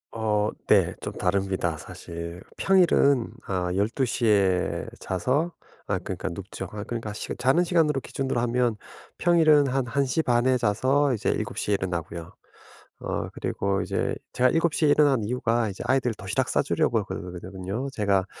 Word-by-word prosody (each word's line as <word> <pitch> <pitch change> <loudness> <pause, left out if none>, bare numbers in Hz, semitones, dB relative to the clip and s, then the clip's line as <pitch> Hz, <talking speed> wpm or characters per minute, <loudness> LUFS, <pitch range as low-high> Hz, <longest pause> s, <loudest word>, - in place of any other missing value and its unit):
어 105 -2 0 0.2
네. - - +4
좀 - - -5
다릅니다 95 -3 0
사실. 85 +1 -8 0.2
평일은 160 -9 +3
아 90 -2 -1
12:00 115 +4 0
에 95 -4 +2
자서 135 - -1 0.3
아 - - 0
그러니까 - - -5
눕죠. 95 +3 -7
아 105 -1 -5
그러니까 115 -2 -5
시 105 - -6
자는 130 +8 +3
시간으로 160 -6 +2
기준으로 135 -2 -2
하면 120 -1 +1 0.4
평일은 155 -4 +5
한 135 0 0
1:30 125 -1 +1
에 130 -1 +4
자서 130 +6 +2
이제 110 - -1
7:00 - - -2
에 - - +4
일어나고요. 85 -3 -4 0.7
어 - - -3
그리고 100 0 -1
이제 - - -1 0.2
제가 125 +1 +4
7:00 165 -1 +2
에 - - +4
일어나는 145 -5 +4
이유가 120 -1 0
이제 95 - -6
아이들 130 -3 +2
도시락 100 -3 -2
싸주려고 - - +1
그러거든요. 95 +7 -5
제가 100 -5 +1
115 Hz, 295 characters per minute, -26 LUFS, 95-135 Hz, 0.7 s, 평일은